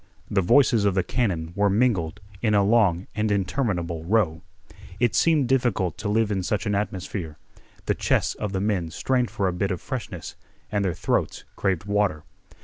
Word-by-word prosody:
The 100 - +3
voices 115 +3 +4
of 100 -2 +2
the 95 - +2
cannon 85 -9 -1
were 100 0 +3
mingled 100 -4 +1 0.2
in 105 -2 +2
a 100 - +4
long 100 -4 +3
and 105 0 0
interminable 90 - -1
row. 85 -4 +1 0.6
It 120 -2 +2
seemed 155 -6 +3
difficult 120 - +1
to 105 - -2
live 110 0 +2
in 95 -2 0
such 100 +3 -1
an 105 - 0
atmosphere. 95 -5 -3 0.5
The - - +2
chests - - +1
of 105 - -4
the 95 -1 -1
men 100 -5 0
strained 125 +7 0
for 105 -3 -1
a 90 - 0
bit 95 +2 -1
of 90 -3 -2
freshness, 110 - -6 0.4
and 105 -1 0
their 90 -4 -1
throats - - -1
craved 95 -4 0
water. 100 -7 0
100 Hz, 180 wpm, -25 LUFS, 90-110 Hz, 0.6 s, voices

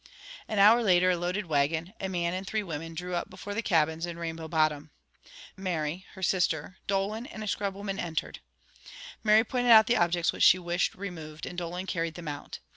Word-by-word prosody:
An 215 - -3
hour 215 +4 +7
later 185 -4 +4
a - - +2
loaded 180 +4 -2
wagon, 160 +4 0
a 190 - -3
man 175 -2 -1
and 185 +1 -4
three 215 +1 -1
women 165 -2 -6
drew 180 +2 -5
up 175 - -2
before 195 +1 -7
the 230 - -1
cabins 165 -4 +1
in 170 -1 -6
Rainbow 165 -1 -5
Bottom. 155 -2 +1 0.7
Mary, 180 -2 -3
her 190 - -9
sister, 175 -2 0
Dolan, 200 +5 -1
and 215 -7 -8
a - - -5
scrub 200 -1 -2
woman 195 -1 -4
entered. 160 -2 -3 0.8
Mary 215 0 +6
pointed 245 +1 -1
out 220 -2 +9
the 240 +2 +2
objects 175 -2 +2
which - - -7
she 185 - +7
wished 175 0 -1
removed, 160 -5 -7
and 180 - -7
Dolan 175 +1 -4
carried 165 -3 -2
them 175 -2 -8
out. 145 -1 -6
180 Hz, 195 wpm, -28 LUFS, 165-200 Hz, 0.8 s, out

